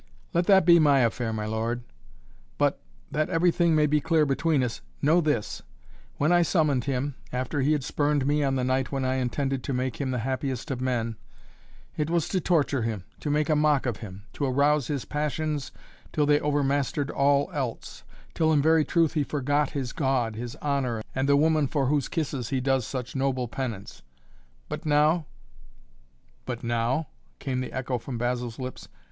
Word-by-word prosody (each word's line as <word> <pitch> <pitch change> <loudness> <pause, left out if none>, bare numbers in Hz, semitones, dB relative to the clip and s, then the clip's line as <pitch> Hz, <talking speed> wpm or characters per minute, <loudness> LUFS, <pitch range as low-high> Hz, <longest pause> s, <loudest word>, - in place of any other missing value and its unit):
"Let 175 0 +1
that 190 -4 +6
be 170 -1 +7
my 145 -3 +5
affair, 115 0 0
my 110 -1 -3
lord, 115 +3 -2 0.7
but - - +1 0.3
that 155 0 0
everything 170 -1 +3
may 155 -1 +4
be 150 0 +2
clear 160 -1 +3
between 145 0 +1
us 120 -2 -3 0.2
know 160 +5 +4
this: 145 -9 -1 0.6
when 150 +4 +2
I 175 0 +5
summoned 150 -7 +2
him, 140 +1 -1 0.2
after 130 +3 -2
he 145 +4 +3
had 145 -3 -1
spurned 145 +1 0
me 145 +1 +2
on 135 -1 +1
the 130 - 0
night 130 +1 0
when 135 -2 -1
I 130 0 0
intended 135 +1 -1
to 140 - -3
make 130 +1 -2
him 135 - -1
the 125 - -1
happiest 135 +1 -3
of 125 -2 -3
men, 115 -3 -1 0.8
it 150 0 -1
was 170 -2 +1
to 185 - 0
torture 145 -6 +1
him, 110 -4 -3 0.2
to 150 - -4
make 150 0 +1
a 155 - +3
mock 150 -2 +3
of 120 -5 -1
him, 100 -3 -9
to 145 - -2
arouse 140 +1 +2
his 140 -4 -3
passions 150 -1 -2 0.4
till 150 - +1
they 145 0 +4
overmastered 145 0 0
all 140 +4 +2
else, 130 -6 -4 0.3
till 160 -1 +2
in 150 - +4
very 160 +2 +4
truth 165 0 +2
he 155 -2 +1
forgot 145 +1 0
his 130 -4 -4
God, 130 -6 0
his 120 +1 -6
honor, 130 -6 -1
and 135 +1 0
the 140 - +5
woman 155 -1 +3
for 140 0 0
whose 140 0 +1
kisses 140 -7 -2
he 135 - 0
does 135 -2 +1
such 130 -2 -5
noble 130 -2 0
penance 115 -6 -5 0.7
but - - -5
now 150 +1 +3 0.6
" 65 0 -35
"But 120 - -4
now?" 120 +5 0 0.3
came 130 -1 -2
the 130 - -5
echo 130 -1 -2
from 120 +1 -6
Basil's 120 -1 -2
lips. 130 -1 -7
140 Hz, 190 wpm, -26 LUFS, 125-150 Hz, 0.8 s, be